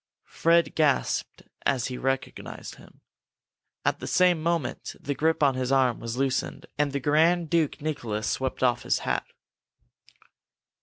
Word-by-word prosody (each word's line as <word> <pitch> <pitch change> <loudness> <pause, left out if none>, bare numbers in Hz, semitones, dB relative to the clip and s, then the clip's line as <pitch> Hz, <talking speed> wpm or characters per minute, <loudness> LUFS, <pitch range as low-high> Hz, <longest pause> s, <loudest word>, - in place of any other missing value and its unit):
Fred 170 +1 +3
gasped 150 -4 0 0.2
as 130 -3 +1
he 130 - -4
recognized 135 0 -3
him. - - -18 0.8
At - - +1
the - - -6
same 180 -3 +3
moment 165 -6 -2
the 145 - -3
grip 160 +3 +1
on 140 -2 +5
his 130 0 -2
arm 130 -3 +3
was 115 +1 -5
loosened, 135 0 -1
and 145 -1 +1
the 140 - -1
Grand 160 +4 +2
Duke 160 -4 +1
Nicholas 110 -9 -2
swept 130 +2 -2
off 120 -1 +3
his - - 0
cap. - - -1
140 Hz, 145 wpm, -26 LUFS, 130-160 Hz, 0.8 s, on